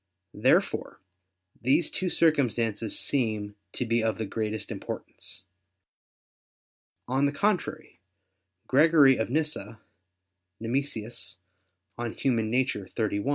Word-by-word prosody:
Therefore - - +1 0.6
these 145 +7 +3
two 185 - -1
circumstances 120 -10 +2
seem 110 -6 0 0.2
to 125 - -2
be 115 0 +2
of 110 -1 0
the 110 - -2
greatest 110 +1 -3
importance. - - -5 1.6
On 135 +3 +2
the - - 0
contrary, 200 +5 -1 0.7
Gregory 145 -2 +6
of 110 - -1
Nyssa 130 -7 -2 0.8
[*Nemesius, 120 -1 -3 0.6
De - - -2
Nat. 120 - -1
Hom. 130 -4 +2
xxxi. 110 -1 -1
120 Hz, 100 wpm, -28 LUFS, 110-140 Hz, 1.6 s, Gregory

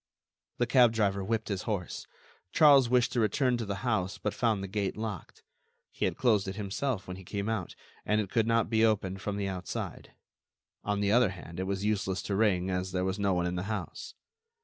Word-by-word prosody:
The 120 - +2
cab 120 -1 +5
driver 100 -3 +1
whipped 110 +2 -2
his 100 -3 -2
horse. 95 -5 -3 0.4
Charles 140 -5 +6
wished 125 -1 +3
to 120 - 0
return 125 +4 +2
to 115 -3 -4
the 100 +1 -4
house, 100 -5 0
but 105 - -2
found 110 -5 0
the - - -4
gate 100 0 -2
locked. 110 -2 -6 0.5
He - - -2
had - - -1
closed 110 -6 +2
it 95 - -4
himself 105 +2 -2
when 90 0 -6
he 95 - -11
came 100 +2 -4
out, 110 -6 -3 0.3
and 105 +2 +1
it 100 -3 -3
could 115 -1 +2
not 115 0 +2
be 110 -1 +2
opened 95 -4 +1
from 100 0 -3
the 100 -1 -1
outside. 90 -2 -5 0.7
On 105 0 -1
the 100 0 +2
other 120 -2 +5
hand, 90 -2 -9
it 95 - -2
was 100 +1 -2
useless 95 -3 0
to 100 - -2
ring, 95 -3 +2
as 90 0 -2
there 90 0 0
was 95 +2 -2
no 100 -2 +2
one 90 0 0
in 90 - -1
the 90 - -2
house. 105 - -5
100 Hz, 215 wpm, -30 LUFS, 95-110 Hz, 0.7 s, Charles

